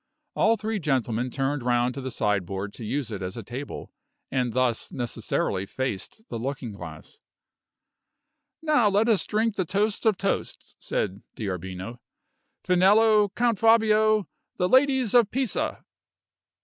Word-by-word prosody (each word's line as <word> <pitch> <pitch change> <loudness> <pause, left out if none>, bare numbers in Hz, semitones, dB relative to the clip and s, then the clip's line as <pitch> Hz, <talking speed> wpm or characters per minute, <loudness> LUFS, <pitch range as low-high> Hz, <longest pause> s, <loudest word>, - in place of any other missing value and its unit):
All 225 +1 +3
three 215 0 -2
gentlemen 130 - 0
turned 135 +2 -1
round 120 0 +1
to 135 - -6
the 130 - -4
sideboard 100 -3 -2
to - - -9
use 130 +2 -2
it 100 -3 -5
as 95 +4 -5
a 115 - -5
table, 130 +7 -7 0.4
and 125 -3 0
thus 125 -3 0
necessarily 110 -6 -2
faced 130 - -4
the 115 - -5
looking 130 -1 -4
glass. 90 -6 -10 1.4
"Now 300 -9 +4
let 205 +3 +2
us 220 -5 +2
drink 220 0 0
the 190 - +2
toast 205 +5 0
of 215 -4 +3
toasts," 195 +1 -3
said 100 0 -2
D'Arbino. 95 +3 -5 0.6
"Finello, 205 +3 +5
Count 235 -3 +1
Fabio 215 -3 +4 0.3
the 180 - +2
ladies 260 -1 +3
of 240 -4 +5
Pisa!" 260 -3 -2
140 Hz, 135 wpm, -26 LUFS, -, 1.4 s, Finello